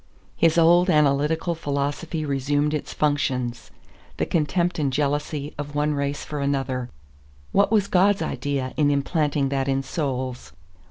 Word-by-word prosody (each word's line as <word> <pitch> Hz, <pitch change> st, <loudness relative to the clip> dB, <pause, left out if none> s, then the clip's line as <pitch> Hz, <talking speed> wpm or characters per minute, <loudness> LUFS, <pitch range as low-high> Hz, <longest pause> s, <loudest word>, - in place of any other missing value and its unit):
His 165 Hz, 0 st, +3 dB
old 175 Hz, +2 st, +5 dB
analytical 150 Hz, +2 st, +2 dB
philosophy 150 Hz, +1 st, -3 dB
resumed 145 Hz, +2 st, 0 dB
its 150 Hz, -, -3 dB
functions. 130 Hz, -5 st, -1 dB, 0.5 s
The -, -, 0 dB
contempt 170 Hz, +2 st, 0 dB
and 140 Hz, -3 st, +1 dB
jealousy 145 Hz, +1 st, -1 dB
of 145 Hz, 0 st, -5 dB
one 150 Hz, +1 st, +1 dB
race 140 Hz, 0 st, -2 dB
for 150 Hz, -, -5 dB
another; 135 Hz, -3 st, -1 dB, 0.6 s
what 200 Hz, +2 st, +3 dB
was 210 Hz, -3 st, +3 dB
God's 195 Hz, +2 st, +3 dB
idea 135 Hz, -2 st, -3 dB
in 145 Hz, -2 st, +3 dB
implanting 145 Hz, -1 st, 0 dB
that 135 Hz, -1 st, -1 dB
in 135 Hz, 0 st, 0 dB
souls? 130 Hz, -3 st, -4 dB
145 Hz, 140 wpm, -24 LUFS, 140-160 Hz, 0.6 s, old